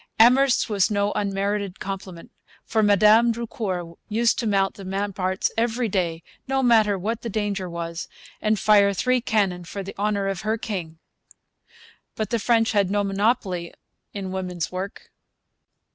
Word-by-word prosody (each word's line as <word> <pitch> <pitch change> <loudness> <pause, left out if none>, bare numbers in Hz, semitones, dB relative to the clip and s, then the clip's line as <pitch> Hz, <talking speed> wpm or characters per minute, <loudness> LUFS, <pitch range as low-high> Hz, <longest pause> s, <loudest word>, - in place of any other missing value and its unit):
Amherst's 255 +3 +5
was 200 -4 +2
no 205 -1 +1
unmerited 200 -1 -2
compliment; 190 -3 -7 0.3
for 220 - +1
Madame 215 +3 +5
Drucour 195 -7 -4
used 230 +2 +2
to 230 - -1
mount 195 -2 +2
the 200 - -11
ramparts 190 0 -1
every 230 +1 0
day, 170 -4 -1 0.2
no 270 0 0
matter 220 -4 +4
what 220 +5 -3
the 235 - -4
danger 205 -3 -2
was, 170 0 -5 0.3
and 215 0 +2
fire 200 -2 +4
three 255 +5 +1
cannon 195 -6 0
for 195 +3 -6
the 195 - -8
honour 205 -1 0
of 195 -2 -2
her 215 +1 -1
king. 175 -8 -5 1.2
But 215 -2 -3
the 235 - +1
French 225 +1 +2
had 200 -3 +2
no 205 +1 +1
monopoly 195 -3 -1 0.4
in 195 -2 -5
woman's 180 -3 -3
work. 185 +2 -6
200 Hz, 150 wpm, -24 LUFS, 190-220 Hz, 1.2 s, Amherst's